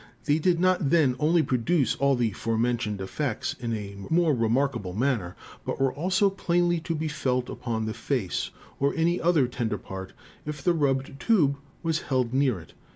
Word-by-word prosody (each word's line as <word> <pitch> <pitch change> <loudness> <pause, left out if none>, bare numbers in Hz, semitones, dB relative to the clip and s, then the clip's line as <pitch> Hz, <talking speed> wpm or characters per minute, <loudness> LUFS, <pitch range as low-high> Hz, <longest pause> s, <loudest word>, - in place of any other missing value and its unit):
They 150 +1 +3
did 170 +1 +2
not 185 -5 +2
then 145 -6 +4
only 160 +2 +3
produce 130 +1 +1
all 140 0 +2
the 120 -3 +1
forementioned 115 0 -1
Effects 115 +5 -2
in 120 -2 -3
a 100 -2 -6
more 165 -1 +3
remarkable 120 -4 0
man 125 +4 +1
ner, 90 -2 -8 0.3
but - - -4
were 135 -1 +2
also 185 +6 +2
plainly 175 -2 +1
to 165 +1 -3
be 160 +1 -2
felt 125 -4 -1
upon 115 -3 -3
the 110 - -2
Face, 120 -10 -2 0.3
or 140 +1 +1
any 170 +2 +1
other 165 -6 +3
tender 120 -4 -2
part, 95 -1 -8 0.3
if 145 -2 -6
the 175 - +3
rubbed 135 -3 0
Tube 155 -12 +3 0.3
was 165 -2 +1
held 130 -3 0
near 130 -7 +2
it. 80 - -15
135 Hz, 180 wpm, -27 LUFS, 115-160 Hz, 0.3 s, then